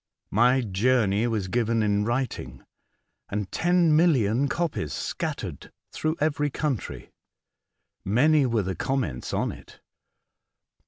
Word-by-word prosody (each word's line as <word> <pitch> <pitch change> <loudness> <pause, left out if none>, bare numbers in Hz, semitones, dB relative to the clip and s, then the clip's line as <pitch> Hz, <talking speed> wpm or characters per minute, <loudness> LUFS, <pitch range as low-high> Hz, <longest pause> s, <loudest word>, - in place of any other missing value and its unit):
My 125 +5 +4
journey 110 0 +1
was 110 -5 -1
given 115 +1 +1
in 105 0 +1
writing, 120 - -3 0.7
and 100 -2 -3
ten 175 -2 +3
million 140 - +3
copies 155 - -2
scattered - - -4 0.2
through 155 +1 -2
every 150 -1 +1
country. 140 -4 -4 0.9
Many 135 +7 +3
were 115 -3 +1
the 95 +1 -2
com 135 +7 -1
ments 65 - -5
on - - 0
it. - - -14
120 Hz, 115 wpm, -26 LUFS, 105-145 Hz, 0.9 s, My